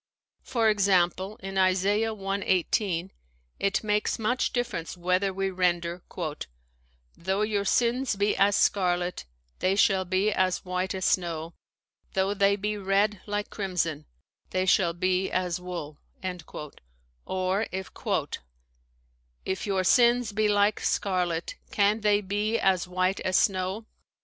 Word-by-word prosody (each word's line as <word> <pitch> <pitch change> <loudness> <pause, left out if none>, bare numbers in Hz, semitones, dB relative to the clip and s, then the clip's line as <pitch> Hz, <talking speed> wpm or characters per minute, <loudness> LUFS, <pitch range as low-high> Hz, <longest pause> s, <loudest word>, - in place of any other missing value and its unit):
For 230 -3 0
example, 195 -1 +2
in 195 0 -2
Isa. 185 +1 +3
i: 205 - +2 0.2
i8, 195 -2 0 0.5
it 200 +2 0
makes 210 0 0
much 240 +3 0
difference 225 -9 -3
whether 185 +2 +1
we 195 0 -2
render, 175 -1 0 1.1
"Though 190 +4 -1
your 210 -2 0
sins 245 +2 +1
be 205 +1 +1
as 200 +1 +3
scarlet, 180 - +1 0.3
they 185 +1 +2
shall 195 -1 +3
be 185 +3 +1
as 185 -2 0
white 185 +1 -2
as 185 - -2
snow; 170 -2 0 0.6
though 190 +1 +1
they 200 0 +3
be 210 +1 -2
red 200 +1 +1
like 205 0 -3
crimson, 170 -6 -2 0.4
they 185 0 0
shall 180 -2 +3
be 185 +2 0
as 180 -1 -1
wool"; 170 -5 -6 1.3
or, 190 +3 0 1.8
"If 190 +2 -3
your 190 -2 +1
sins 240 +3 +4
be 215 +1 +1
like 205 0 +3
scarlet, 180 -4 -1
can 210 +2 +2
they 210 -1 +3
be 205 +3 -1
as 185 -3 +2
white 185 +1 0
as 185 - -1
snow? 190 +2 0
190 Hz, 125 wpm, -27 LUFS, 185-205 Hz, 1.8 s, sins